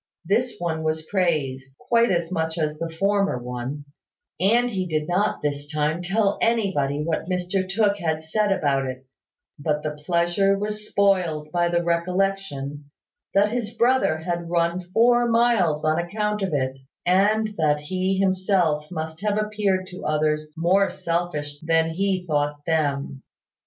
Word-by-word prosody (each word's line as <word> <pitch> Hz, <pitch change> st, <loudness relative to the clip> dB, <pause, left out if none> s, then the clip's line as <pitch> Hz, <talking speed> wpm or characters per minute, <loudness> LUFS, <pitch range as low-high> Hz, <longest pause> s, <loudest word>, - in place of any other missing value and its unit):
This 235 Hz, +7 st, +1 dB
one 165 Hz, -2 st, -2 dB
was 155 Hz, 0 st, -1 dB
praised, 140 Hz, -8 st, -1 dB
quite 235 Hz, 0 st, +2 dB
as 170 Hz, -1 st, 0 dB
much 160 Hz, -1 st, -1 dB
as 155 Hz, -1 st, -1 dB
the 165 Hz, -, -3 dB
former 195 Hz, 0 st, +1 dB
one: 125 Hz, +4 st, -5 dB, 0.5 s
and 235 Hz, +7 st, +3 dB
he 185 Hz, -3 st, -2 dB
did 155 Hz, -2 st, -1 dB
not 195 Hz, +2 st, 0 dB
this 145 Hz, 0 st, -3 dB
time 155 Hz, +2 st, 0 dB
tell 200 Hz, +3 st, +1 dB
anybody 185 Hz, -11 st, +1 dB
what 160 Hz, +2 st, -2 dB
Mr 185 Hz, +1 st, -1 dB
Tooke 200 Hz, 0 st, +2 dB
had 160 Hz, -3 st, -1 dB
said 210 Hz, +6 st, 0 dB
about 140 Hz, -8 st, +1 dB
it: 130 Hz, 0 st, -8 dB, 0.5 s
but 150 Hz, 0 st, -1 dB
the 155 Hz, -, -1 dB
pleasure 175 Hz, +4 st, +2 dB
was 210 Hz, +1 st, -4 dB
spoiled 180 Hz, -7 st, +1 dB
by 175 Hz, 0 st, +1 dB
the 170 Hz, 0 st, +1 dB
recollection 170 Hz, -5 st, -1 dB, 0.5 s
that 205 Hz, +1 st, +4 dB
his 230 Hz, -2 st, -3 dB
brother 240 Hz, -9 st, +3 dB
had 170 Hz, +1 st, -4 dB
run 170 Hz, +1 st, +1 dB
four 240 Hz, +3 st, +4 dB
miles 225 Hz, -11 st, +2 dB
on 155 Hz, +1 st, +2 dB
account 210 Hz, +4 st, -2 dB
of 190 Hz, -2 st, -1 dB
it, 135 Hz, -2 st, -1 dB, 0.3 s
and 210 Hz, +4 st, +3 dB
that 150 Hz, -1 st, +2 dB
he 185 Hz, +5 st, -1 dB
himself 185 Hz, -5 st, +1 dB
must 160 Hz, -1 st, -5 dB
have 210 Hz, 0 st, 0 dB
appeared 210 Hz, -3 st, 0 dB
to 185 Hz, 0 st, -10 dB
others 155 Hz, 0 st, 0 dB
more 190 Hz, +4 st, +3 dB
selfish 165 Hz, -5 st, -3 dB
than 165 Hz, 0 st, +1 dB
he 190 Hz, +1 st, -1 dB
thought 145 Hz, -2 st, 0 dB
them. 140 Hz, -4 st, -1 dB
175 Hz, 150 wpm, -24 LUFS, 155-195 Hz, 0.5 s, that